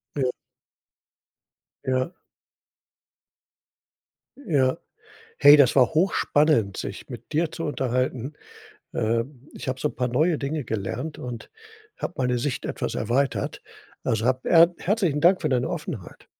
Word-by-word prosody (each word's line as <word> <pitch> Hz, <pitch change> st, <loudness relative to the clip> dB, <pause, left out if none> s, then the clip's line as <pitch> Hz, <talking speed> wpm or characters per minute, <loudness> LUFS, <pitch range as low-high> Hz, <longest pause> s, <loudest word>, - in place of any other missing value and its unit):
Ja. 130 Hz, -3 st, +1 dB, 1.5 s
Ja. 130 Hz, +4 st, 0 dB, 2.4 s
Ja. 135 Hz, -3 st, +2 dB, 0.6 s
Hey, 145 Hz, +1 st, +9 dB
das 140 Hz, -3 st, +4 dB
war 130 Hz, -2 st, +6 dB
hochspannend, 150 Hz, -, +2 dB
sich -, -, -6 dB
mit -, -, -10 dB
dir 160 Hz, +1 st, +1 dB
zu 165 Hz, -, -5 dB
unterhalten. 130 Hz, -2 st, -1 dB, 0.6 s
Ähm, 120 Hz, +5 st, -2 dB
ich -, -, -9 dB
habe 130 Hz, 0 st, -2 dB
so 150 Hz, -, 0 dB
'n -, -, -13 dB
paar 125 Hz, -1 st, 0 dB
neue 155 Hz, +6 st, +2 dB
Dinge 145 Hz, +2 st, -3 dB
gelernt 110 Hz, +9 st, -4 dB
und 120 Hz, -2 st, -7 dB, 0.5 s
habe -, -, -4 dB
meine 125 Hz, -1 st, +1 dB
Sicht 130 Hz, +1 st, -2 dB
etwas -, -, -3 dB
erweitert. 130 Hz, +5 st, -1 dB, 0.4 s
Also, 110 Hz, 0 st, 0 dB
hab 130 Hz, +1 st, +1 dB
er 170 Hz, +1 st, +6 dB
herzlichen 180 Hz, -7 st, 0 dB
Dank 185 Hz, +2 st, +5 dB
für 155 Hz, -, 0 dB
deine 125 Hz, -1 st, +1 dB
Offenheit. 150 Hz, -, -6 dB
135 Hz, 130 wpm, -25 LUFS, 125-155 Hz, 2.4 s, Hey